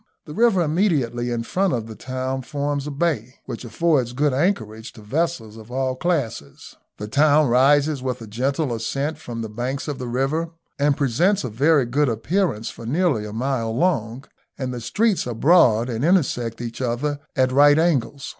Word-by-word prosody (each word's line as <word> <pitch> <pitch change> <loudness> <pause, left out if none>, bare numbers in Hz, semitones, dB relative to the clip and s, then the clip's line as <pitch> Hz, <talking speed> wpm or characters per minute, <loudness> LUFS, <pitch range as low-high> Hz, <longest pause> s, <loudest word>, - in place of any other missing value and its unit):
The 150 - -9
river 220 -3 +3
immediately 150 - 0
in 120 -1 -2
front 190 +10 0
of 115 -3 -2
the 110 - -8
town 130 +2 -4
forms 145 +1 -3
a - - -2
bay, 140 -5 -2
which 120 -2 -6
affords 130 -1 0
good 145 +2 +1
anchorage 120 - -1
to 110 - -13
vessels 115 -3 -2
of 110 +1 -12
all 130 0 -1
classes. 125 - -3 0.2
The 105 - -6
town 145 +3 +4
rises 140 +3 +3
with 130 -1 -3
a 115 - -8
gentle 130 +5 -1
ascent 140 +7 -3
from 115 -6 -6
the - - -4
banks 125 +6 -4
of 145 -3 -4
the 125 - -4
river, 135 +7 -1 0.3
and 145 0 +2
presents 165 - +2
a 125 - -3
very 140 +5 +3
good 140 +4 +1
appearance 120 - -1
for 115 - -10
nearly 145 -6 +1
a - - -7
mile 115 -1 -2
long, 130 -7 0 0.3
and 130 -2 -3
the 120 - -5
streets 205 - 0
are 120 - -4
broad 120 -5 +4
and 120 0 -3
intersect 130 -10 +1
each 120 +1 -6
other 130 +4 -1 0.2
at 130 -1 +2
right 145 +2 +6
angles. 145 -4 0
130 Hz, 185 wpm, -22 LUFS, 115-150 Hz, 0.3 s, right